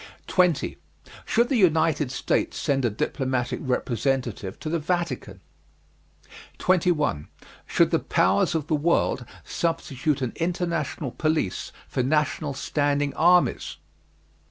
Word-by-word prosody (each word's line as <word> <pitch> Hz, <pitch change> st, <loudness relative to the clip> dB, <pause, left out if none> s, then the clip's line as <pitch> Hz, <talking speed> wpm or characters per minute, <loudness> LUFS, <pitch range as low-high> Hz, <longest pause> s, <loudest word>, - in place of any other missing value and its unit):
20. 180 Hz, -5 st, +1 dB, 0.5 s
Should 235 Hz, +2 st, +2 dB
the 270 Hz, -, +2 dB
United 160 Hz, -5 st, +3 dB
States -, -, -1 dB
send 135 Hz, -3 st, 0 dB
a 120 Hz, -, +3 dB
diplomatic 125 Hz, +3 st, -2 dB
representative 125 Hz, -, -1 dB
to -, -, -7 dB
the 165 Hz, +2 st, 0 dB
Vatican? 150 Hz, -, -3 dB, 1.2 s
21. 165 Hz, -, +1 dB, 0.4 s
Should -, -, +3 dB
the -, -, +3 dB
Powers 100 Hz, -, +2 dB
of 155 Hz, -3 st, -1 dB
the 155 Hz, -, -2 dB
world 150 Hz, -4 st, +1 dB, 0.2 s
substitute 150 Hz, -4 st, -1 dB
an 120 Hz, -, -2 dB
international 170 Hz, -5 st, -2 dB
police 155 Hz, -, -1 dB, 0.2 s
for -, -, -1 dB
national 150 Hz, +1 st, 0 dB
standing 145 Hz, 0 st, 0 dB
armies? 175 Hz, +2 st, +3 dB
150 Hz, 110 wpm, -25 LUFS, 130-165 Hz, 1.2 s, United